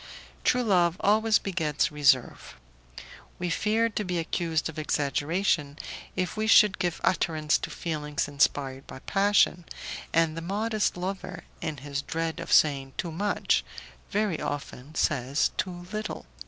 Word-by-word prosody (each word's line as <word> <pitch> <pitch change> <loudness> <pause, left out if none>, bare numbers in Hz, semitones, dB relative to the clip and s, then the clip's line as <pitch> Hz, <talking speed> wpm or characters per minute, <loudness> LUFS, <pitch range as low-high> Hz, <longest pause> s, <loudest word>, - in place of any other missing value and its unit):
True 250 0 +3
love 180 -5 +3
always 215 +1 +4
begets 160 -8 -1
reserve; 135 - +2 0.8
we 180 -1 -2
fear 220 +7 +2
to 215 -1 -3
be 180 -2 -2
accused 165 -1 -1
of 160 -1 -6
exaggeration 150 +1 0 0.4
if 185 +1 -2
we 215 0 -1
should 210 -2 +6
give 175 -2 -1
utterance 155 -4 +1
to - - -5
feelings 150 -3 -3
inspired, 140 -2 0
by - - -9
passion, 195 +2 +2 0.5
and 165 -1 +2
the 165 - -4
modest 210 +3 -1
lover, 185 -1 -5 0.2
in 155 -3 -3
his 140 +1 -4
dread 165 +2 -3
of - - -6
saying 135 -3 +4
too 170 - -3
much, 200 +6 +1 0.5
very 205 -5 0
often 145 0 -5
says 140 -1 +1
too 175 -2 -4
little. 215 0 -4
165 Hz, 140 wpm, -27 LUFS, 150-195 Hz, 0.8 s, should